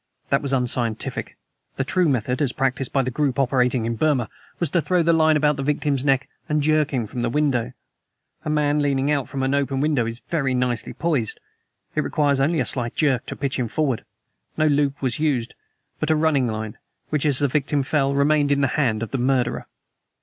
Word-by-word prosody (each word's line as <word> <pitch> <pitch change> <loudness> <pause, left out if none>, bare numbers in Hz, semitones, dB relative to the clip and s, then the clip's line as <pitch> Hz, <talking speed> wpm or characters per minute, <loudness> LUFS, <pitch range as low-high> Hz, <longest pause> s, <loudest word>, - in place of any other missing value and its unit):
That 140 - +3
was 140 - -3
unscientific. 125 -3 -1 0.4
The 135 - -1
true 180 +4 +1
method, 125 +1 0
as 135 -4 +1
practiced 135 -1 -1
by 135 - +2
the 130 - -2
group 140 0 0
operating 125 -3 +2
in 115 0 -2
Burma, 135 -4 +1 0.3
was 170 -5 0
to 170 - +2
throw 175 +3 +1
the 170 +1 +3
line 160 -1 +4
about 150 -1 +2
the - - -2
victim's 140 -1 0
neck 135 -2 +2 0.2
and 150 0 +2
jerk 155 -1 +2
him 125 -5 -1
from 120 +3 -5
the 120 - 0
window. 125 -3 0 0.7
A - - -3
man 150 -1 +2
leaning 140 0 +1
from 135 -2 -4
an 135 +1 +1
open 140 -1 0
window 145 -5 +1
is 115 +1 -6
very 135 -6 0
nicely 125 -2 -1
poised: 145 -10 -1 0.5
it - - +1
requires 145 -2 +1
only 155 +4 +2
a 125 - +1
slight 120 -1 -2
jerk 135 -5 +1
to - - -5
pitch 140 -1 -2
him 125 - 0
forward. 135 0 -1 0.5
No 155 - +3
loop 145 -2 +1
was 125 0 0
used, 135 -7 0 0.5
but 155 - -1
a 160 - +4
running 155 -5 +2
line, 110 -1 -5 0.3
which, 150 -2 +1
as 145 -4 +2
the 145 - +2
victim 140 +1 0
fell, 140 0 +1
remained 145 0 +3
in 140 0 +2
the 140 - +2
hand 115 -6 +1
of 115 - -6
the 135 - -1
murderer. 125 -1 0
140 Hz, 210 wpm, -23 LUFS, 125-150 Hz, 0.7 s, line